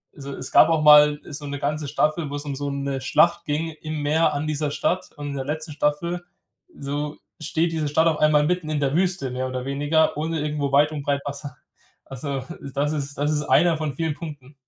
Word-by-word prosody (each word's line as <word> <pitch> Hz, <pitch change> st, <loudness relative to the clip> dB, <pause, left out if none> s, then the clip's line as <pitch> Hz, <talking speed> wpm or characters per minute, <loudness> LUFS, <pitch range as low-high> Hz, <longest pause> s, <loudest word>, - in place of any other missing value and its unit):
also 140 Hz, -1 st, -8 dB
es -, -, -7 dB
gab 160 Hz, -, +7 dB
auch 160 Hz, -2 st, +2 dB
mal 150 Hz, 0 st, +7 dB
so 145 Hz, 0 st, -7 dB
'ne 140 Hz, 0 st, -4 dB
ganze 150 Hz, +1 st, -2 dB
Staffel, 155 Hz, +1 st, 0 dB
wo 145 Hz, -, -5 dB
es 145 Hz, +1 st, -5 dB
um 140 Hz, -1 st, -3 dB
so 145 Hz, +1 st, -3 dB
'ne 140 Hz, -1 st, -3 dB
Schlacht 170 Hz, +6 st, +3 dB
ging 160 Hz, +2 st, -1 dB
im 155 Hz, -1 st, -4 dB
Meer 155 Hz, +1 st, +2 dB
an 145 Hz, +2 st, -2 dB
dieser 150 Hz, -1 st, -1 dB
Stadt. 185 Hz, +4 st, -1 dB
Und 145 Hz, -1 st, -5 dB
in 140 Hz, -, -5 dB
der 135 Hz, -, -3 dB
letzten 155 Hz, +2 st, -4 dB
Staffel, 170 Hz, +4 st, -1 dB, 0.5 s
so, 145 Hz, +2 st, -4 dB, 0.2 s
steht 165 Hz, +2 st, 0 dB
diese 155 Hz, -2 st, -1 dB
Stadt 160 Hz, +3 st, +3 dB
auf 155 Hz, -2 st, +1 dB
einmal 150 Hz, -1 st, +4 dB
mitten 180 Hz, -2 st, -1 dB
in 150 Hz, -1 st, 0 dB
der 140 Hz, +1 st, 0 dB
Wüste, 180 Hz, -7 st, 0 dB
mehr 130 Hz, +1 st, -2 dB
oder 130 Hz, 0 st, -4 dB
weniger, 145 Hz, +3 st, +1 dB
ohne 160 Hz, +1 st, -2 dB
irgendwo 150 Hz, -2 st, -2 dB
weit 145 Hz, +2 st, +4 dB
und 150 Hz, -2 st, -4 dB
breit 140 Hz, 0 st, 0 dB
Wasser. 140 Hz, -1 st, -6 dB, 0.5 s
Also 135 Hz, 0 st, -5 dB, 0.3 s
das 145 Hz, +2 st, 0 dB
ist 140 Hz, -2 st, -4 dB
das 145 Hz, +2 st, 0 dB
ist 150 Hz, 0 st, 0 dB
einer 170 Hz, +2 st, +4 dB
von 155 Hz, -3 st, -3 dB
vielen 160 Hz, -1 st, -1 dB
Punkten. 145 Hz, -5 st, -9 dB
150 Hz, 220 wpm, -23 LUFS, 140-155 Hz, 0.5 s, gab